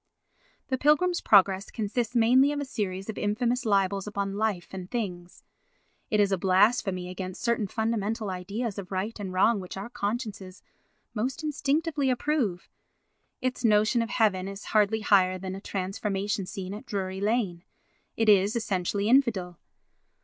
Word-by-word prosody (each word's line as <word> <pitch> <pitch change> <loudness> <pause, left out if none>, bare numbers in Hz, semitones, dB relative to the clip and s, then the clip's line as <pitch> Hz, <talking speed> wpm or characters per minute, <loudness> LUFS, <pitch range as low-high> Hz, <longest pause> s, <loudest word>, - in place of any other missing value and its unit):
The 260 -1 -1
Pilgrim's 345 +6 +3
Progress 195 -1 +4
consists 230 +2 -2
mainly 250 +5 +5
of 295 - -2
a 285 - -3
series 195 -6 -4
of 220 - -5
infamous 235 +4 0
libels 195 -1 +1
upon 200 -1 -3
life 205 -4 -1
and 185 -1 -7
things; 180 -7 -5 0.7
it 210 - +1
is 200 -1 +3
a 190 - +1
blasphemy 190 0 +2
against 185 0 -6
certain 235 -3 +1
fundamental 220 -1 -2
ideas 200 +4 -4
of 195 -1 -9
right 195 +4 -2
and 195 -2 -5
wrong 200 +4 +3
which 185 0 -8
our 200 +4 -6
consciences 205 -5 -4 0.5
most 255 +7 -3
instinctively 295 0 0
approve; 250 - -1 0.7
its 255 0 -2
notion 215 +2 +3
of 230 - -3
heaven 200 -6 +1
is 195 +1 -8
hardly 215 0 +3
higher 185 -3 +4
than 185 0 -6
a 195 - -7
transformation 195 0 -2
scene 190 -1 -6
at 210 - -9
Drury 190 -1 -3
Lane; 205 -5 0 0.5
it 225 - +1
is 205 +1 +5
essentially 200 -2 -1
infidel. 220 -9 +2
205 Hz, 150 wpm, -27 LUFS, 190-235 Hz, 0.7 s, mainly